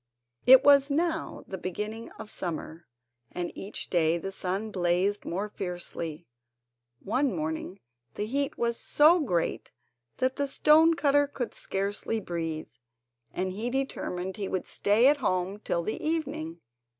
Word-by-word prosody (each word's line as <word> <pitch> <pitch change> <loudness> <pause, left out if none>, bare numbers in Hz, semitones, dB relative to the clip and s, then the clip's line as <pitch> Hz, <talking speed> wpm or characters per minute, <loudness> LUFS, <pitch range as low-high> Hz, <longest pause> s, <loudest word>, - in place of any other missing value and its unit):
It 260 +1 +9
was 280 0 +6
now 320 +2 -1
the 190 - -6
beginning 210 +6 -5
of 220 -1 -8
summer, 170 -1 -5 0.4
and 175 -1 -4
each 195 - -6
day 165 -1 +3
the 195 +3 -5
sun 195 +3 -2
blazed 185 +2 +1
more 195 +5 -2
fiercely. 175 -4 -5 0.8
One 255 +1 +1
morning 160 +4 -4 0.4
the 210 - -2
heat 275 +5 -1
was 235 0 0
so 315 +4 +5
great 180 - -1 0.5
that 260 0 0
the 285 - 0
stone 315 +4 +5
cutter 290 -2 +3
could 260 -4 -4
scarcely 200 +3 -2
breathe, 165 -5 -4 0.6
and 185 +1 -2
he 215 +6 -3
determined 190 -8 -3
he 200 -2 -3
would 185 - -2
stay 210 +4 +2
at 290 +1 +5
home 190 -5 -1
till 170 -5 -1
the 215 - -4
evening. 175 - -2
205 Hz, 140 wpm, -28 LUFS, 180-270 Hz, 0.8 s, It